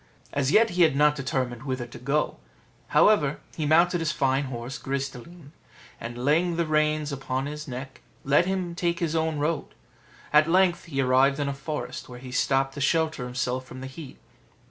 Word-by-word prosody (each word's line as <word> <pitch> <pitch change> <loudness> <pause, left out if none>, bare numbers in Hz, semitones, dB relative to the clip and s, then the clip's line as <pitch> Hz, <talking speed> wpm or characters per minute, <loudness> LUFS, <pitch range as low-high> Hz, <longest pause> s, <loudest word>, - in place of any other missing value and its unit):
As 140 -1 +1
yet 225 +3 +5
he 180 0 0
had 160 -5 +5
not 150 +1 +4
determined 130 -3 -2
whither 130 -3 -3
to 120 - -11
go; 140 +5 0 0.5
however, 150 -10 +4 0.2
he 155 -2 -2
mounted 170 +3 +4
his 165 -1 0
fine 135 -1 +1
horse 125 0 -6
Gris 140 0 -2
de 135 -3 -10
line, 170 +1 -14 0.5
and, 120 +1 -6
laying 165 +4 +2
the 170 0 0
reins 155 -1 +1
upon 135 -1 -3
his 150 +2 -6
neck, 130 +1 -7 0.2
let 145 +6 +3
him 185 -2 -2
take 170 -1 -1
his 165 -2 -1
own 160 -1 0
road: 150 +2 -2 0.6
at 150 +2 +5
length 185 0 +3
he 135 -5 -1
arrived 135 +2 +3
in 145 - 0
a 140 - -1
forest, 135 -3 -5
where 125 - -9
he 125 0 -10
stopped 135 +1 +1
to 140 - -6
shelter 155 -2 +1
himself 125 +1 -2
from 130 0 -10
the 130 - -6
heat. 135 +1 -9
145 Hz, 190 wpm, -26 LUFS, 130-160 Hz, 0.6 s, yet